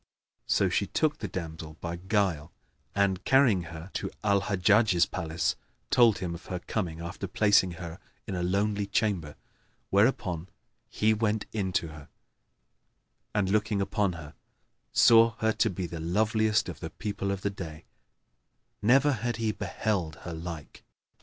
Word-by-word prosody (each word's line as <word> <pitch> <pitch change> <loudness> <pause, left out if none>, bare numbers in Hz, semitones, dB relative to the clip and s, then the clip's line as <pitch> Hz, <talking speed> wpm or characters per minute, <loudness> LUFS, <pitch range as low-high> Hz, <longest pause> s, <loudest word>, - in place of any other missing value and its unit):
So - - +3
she - - 0
took 155 -1 0
the 105 - -3
damsel 80 -3 -6
by 85 0 -4
guile 95 -5 0 0.4
and, 100 -2 +1
carrying 125 -10 +4
her 85 +3 -9
to - - -3
Al 100 -2 +3
Hajjaj's 100 -1 +3
palace, 80 -1 -2 0.4
told 120 -4 +5
him 90 -2 -3
of 85 - -10
her 90 - -3
coming, 85 -3 -3
after 85 +3 -5
placing 100 -1 +3
her 85 -1 -8 0.3
in - - -5
a 90 - -2
lonely 100 +3 0
chamber; 100 -8 -1 0.6
whereupon 95 -5 +1 0.4
he 110 +1 +2
went 110 -1 0
in 100 -4 -1
to 85 -2 0
her 75 -2 -12 1.3
and, 95 -2 +1
looking 105 -1 +1
upon 100 -1 0
her, 80 -3 -9 0.6
saw 115 0 +6
her 110 -1 +2
to - - +2
be 90 0 -4
the 85 -1 -6
loveliest 110 +5 +1
of - - -7
the - - -5
people 100 -2 -4
of 100 -1 -2
the 100 - -1
day, 80 -5 -8 1.0
never 135 +7 +5
had 120 -1 -2
he 110 -1 0
beheld 95 -7 -2
her 85 - -5
like. 80 -2 -8
100 Hz, 155 wpm, -28 LUFS, 85-105 Hz, 1.3 s, saw